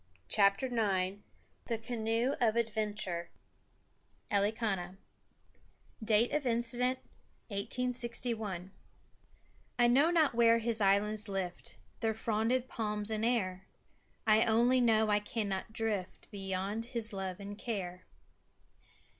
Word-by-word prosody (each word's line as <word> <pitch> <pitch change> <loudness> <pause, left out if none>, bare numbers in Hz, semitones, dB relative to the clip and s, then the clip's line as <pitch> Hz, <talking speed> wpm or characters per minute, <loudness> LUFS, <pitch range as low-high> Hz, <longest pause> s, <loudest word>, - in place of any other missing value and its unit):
] 90 - -37
CHAPTER 200 +4 +4
IX 200 -6 0 0.5
THE 230 - -1
CANOE 230 +2 -1
OF 225 -2 +3
ADVENTURE 210 -6 -1 1.0
Elikana 200 -3 0 1.1
(Date 220 +2 +3
of 300 - 0
Incident, 240 +2 +1 0.5
1861) 230 -3 -2 1.1
"I 240 - +5
know 270 +7 +5
not 320 -6 +3
where 230 0 +5
His 230 -1 -1
islands 205 +2 +2
lift 190 -2 -4 0.2
Their 220 -1 0
fronded 225 +3 0
palms 210 -2 -2
in 215 0 -1
air; 190 -6 0 0.6
I 220 +1 +5
only 240 +3 +4
know 220 -2 +3
I 205 - +4
cannot 205 -2 -3
drift 215 -4 -3
Beyond 195 +2 -3
His 230 -3 -3
love 190 -1 -4
and 200 0 -7
care." 190 -5 -4
220 Hz, 110 wpm, -33 LUFS, 200-235 Hz, 1.1 s, I